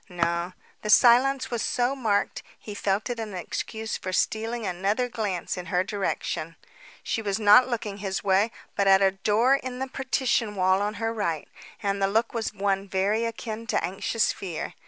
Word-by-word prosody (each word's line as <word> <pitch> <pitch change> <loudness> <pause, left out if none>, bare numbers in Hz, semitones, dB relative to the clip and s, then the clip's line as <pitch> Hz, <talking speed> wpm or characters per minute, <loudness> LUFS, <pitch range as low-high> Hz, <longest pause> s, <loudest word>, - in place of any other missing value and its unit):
No. 175 0 -1 0.3
The 210 - -5
silence 255 +4 +5
was 235 -2 -1
so 250 +2 0
marked, 215 -6 0 0.2
he 210 - -9
felt 205 +3 -1
it 240 - -4
an 215 -3 -5
excuse 220 +4 -4
for 185 - -5
stealing 225 +4 -1
another 195 +7 0
glance 205 -7 -3
in 180 0 -6
her 180 0 +1
direction. 190 -5 -3 0.5
She 225 - -2
was 200 -3 -1
not 215 +5 +7
looking 215 -4 -3
his 195 -1 -3
way 195 +3 +3 0.3
but 200 -1 +1
at 195 0 +6
a 195 - +4
door 210 +6 +2
in 255 -2 -6
the 265 +1 -3
partition 255 -4 0
wall 185 0 +3
on 210 +1 -1
her 225 0 -2
right; 170 -9 -2 0.4
and 200 0 -1
the 195 - +3
look 225 +4 0
was 230 -2 -2
one 195 -1 -1
very 200 +4 +1
akin 230 0 -5
to - - 0
anxious 195 +5 0
fear. 180 -5 -5
210 Hz, 180 wpm, -26 LUFS, 195-230 Hz, 0.5 s, not